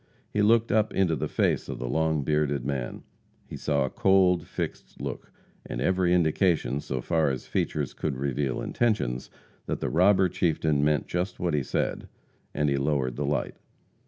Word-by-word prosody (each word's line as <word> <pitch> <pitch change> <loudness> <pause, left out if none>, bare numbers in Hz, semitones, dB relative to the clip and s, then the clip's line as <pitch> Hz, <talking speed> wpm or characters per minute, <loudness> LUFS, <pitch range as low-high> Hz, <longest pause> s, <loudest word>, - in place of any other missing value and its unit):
He 105 - +2
looked 115 +2 +4
up 110 -1 +2
into 90 -4 +2
the 65 - -2
face - - 0
of - - -4
the 60 - -4
long 80 +2 +1
bearded 75 -3 0
man. 65 -3 -3 0.4
He - - -9
saw 70 -3 0
a - - -3
cold, 95 -2 +3
fixed - - -5
look, - - -6 0.3
and - - -5
every 95 -1 +2
indication, 80 -5 +2
so 65 -3 -4
far 80 +1 +1
as 65 -1 -4
features 75 -3 -2
could 70 -4 -3
reveal 70 0 -1
intentions, 105 - 0 0.4
that - - -2
the - - -2
robber 95 +3 +4
chieftain 80 -4 +1
meant 75 0 +2
just 90 +2 -3
what 85 -2 0
he 75 - +2
said, 65 - -2 0.4
and 75 +1 0
he 70 -1 +1
lowered 70 -3 0
the 70 +1 -2
light. 75 - -1
75 Hz, 175 wpm, -27 LUFS, 70-90 Hz, 0.4 s, looked